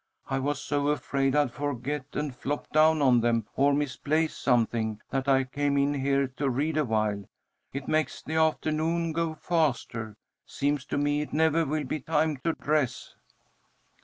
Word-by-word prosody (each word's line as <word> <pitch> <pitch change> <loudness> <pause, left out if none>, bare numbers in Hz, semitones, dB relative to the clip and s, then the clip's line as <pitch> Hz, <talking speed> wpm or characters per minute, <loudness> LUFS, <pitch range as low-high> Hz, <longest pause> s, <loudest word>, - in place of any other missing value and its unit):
I 135 - -1
was 145 +1 -1
so 145 0 -1
afraid 140 -2 0
I'd 145 -4 +3
forget 145 0 -3
and 150 -2 -2
flop 145 +4 -3
down 155 0 +4
on 125 -3 +5
them, 115 -2 +1
or 140 +1 +4
misplace 150 +2 0
something, 115 -3 +1
that 135 0 -1
I 135 -1 +4
came 140 +2 -1
in 140 +1 +2
here 140 0 +1
to 140 -2 0
read 145 +5 0
awhile. 110 -8 0 0.5
It 135 0 -6
makes 155 0 0
the 160 - -5
afternoon 160 +1 +1
go 165 0 -1
faster. 120 -10 -1 0.3
Seems 140 -1 -1
to 145 - -3
me 145 +1 +1
it 150 - -6
never 160 +1 +3
will 150 +1 -1
be 150 +3 -3
time 155 +1 0
to 165 +6 -1
dress." 150 -5 -1
145 Hz, 160 wpm, -28 LUFS, 130-155 Hz, 0.5 s, on